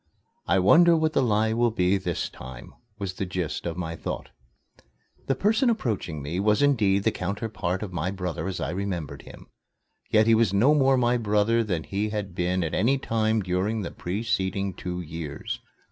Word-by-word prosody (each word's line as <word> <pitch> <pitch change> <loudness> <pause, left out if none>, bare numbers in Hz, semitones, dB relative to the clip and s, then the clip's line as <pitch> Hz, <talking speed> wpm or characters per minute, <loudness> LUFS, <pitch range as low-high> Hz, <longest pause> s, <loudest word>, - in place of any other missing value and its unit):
"I 95 - +3
wonder 165 - +6
what 155 0 +1
the - - +3
lie 110 -2 +2
will 120 +1 +3
be 95 -4 +2
this 90 -3 -2
time," 65 -1 -11 0.2
was 100 -3 -4
the 95 - -3
gist 90 -2 -3
of 85 0 -4
my 85 -2 -4
thoughts. - - -5 1.0
The 135 - +2
person 220 - +2
approaching 105 - -2
me 80 +6 -3
was 105 +6 +3
indeed 105 -9 +3
the 110 - +3
counterpart 100 -1 -3
of 95 -3 -6
my 90 +1 -1
brother 90 -2 -4
as 95 - -3
I 70 - -2
remembered 90 -5 -4
him. - - -13 0.6
Yet 110 0 +4
he 115 - +5
was 110 -3 +3
no 120 +10 +5
more 135 -2 +4
my 120 0 +2
brother 110 +1 +2
than 90 -7 -2
he 100 +2 -2
had 105 -3 -4
been 90 +1 0
at 80 - -3
any 135 +5 +2
time 110 -4 0
during 95 +4 -1
the 85 - -5
preceding 95 0 -2
two 90 0 -5
years. 80 -2 -6
100 Hz, 185 wpm, -26 LUFS, 90-115 Hz, 1.0 s, wonder